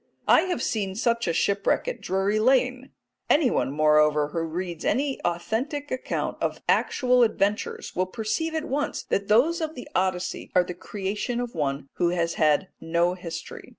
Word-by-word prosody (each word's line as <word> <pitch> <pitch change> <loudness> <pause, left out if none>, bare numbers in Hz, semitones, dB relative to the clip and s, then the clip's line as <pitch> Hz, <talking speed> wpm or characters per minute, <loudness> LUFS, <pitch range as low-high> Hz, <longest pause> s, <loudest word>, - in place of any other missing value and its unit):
I - - +7
have 265 -9 -1
seen 195 -4 -1
such 235 +1 0
a - - +2
shipwreck 200 - +1
at - - -4
Drury 195 +3 0
Lane. 255 +2 +2 0.4
Anyone, 280 - +3
moreover, 150 0 +3
who 165 - -3
reads 170 +1 -4
any 275 0 0
authentic 240 - -2
account 255 - -3
of - - -1
actual 250 -2 +3
adventures 210 -2 0
will 185 0 +1
perceive 235 - -2
at 315 -1 -1
once 290 -1 -2
that 200 0 -1
those 295 +11 +3
of 315 0 -3
the 250 - -8
Odyssey 185 -1 -1
are 180 - +6
the 180 - -6
creation 205 +6 -3
of 245 -1 -4
one 140 -3 -2
who 175 - +2
has 170 -1 0
had 155 +5 +2
no 170 +2 +1
history. 175 -2 -8
200 Hz, 165 wpm, -25 LUFS, 170-250 Hz, 0.4 s, I